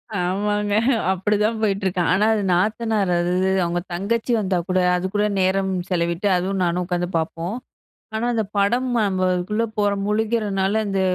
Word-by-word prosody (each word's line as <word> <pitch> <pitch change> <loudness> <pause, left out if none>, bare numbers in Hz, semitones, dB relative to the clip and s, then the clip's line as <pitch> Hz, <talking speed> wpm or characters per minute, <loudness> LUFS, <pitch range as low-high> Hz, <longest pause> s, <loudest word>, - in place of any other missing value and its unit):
ஆமாங்க. 205 +3 -1 0.4
அப்படிதான் 210 +4 0
போயிட்டுருக்கேன். 195 -4 0
ஆனா, 200 +3 +3
அது 210 -2 0
நாத்தனார் 215 +2 +1
அது 175 +1 0 0.3
அவங்க 175 0 -1
தங்கச்சி 220 +7 -1
வந்தா 190 -3 0
கூட, 185 0 +2 0.2
அதுக்கூட 190 +3 -1 0.2
நேரம் 190 +1 +1 0.2
செலவிட்டு 170 +1 0
அதுவும் 190 +2 -2
நானும் 175 +1 0
உட்காந்து 175 0 -2
பார்ப்போம். 165 +4 -3 0.6
ஆனா, 220 +2 -1
அந்த 220 -1 0
படம் 240 +6 +2 0.2
நம்ம 185 -2 0
அதுக்குள்ளே 210 +6 -1
போகிற 205 -1 +2
முழுக்கிறனால, 210 -2 0
அந்த 195 -1 -1
195 Hz, 140 wpm, -22 LUFS, 180-210 Hz, 0.6 s, ஆனா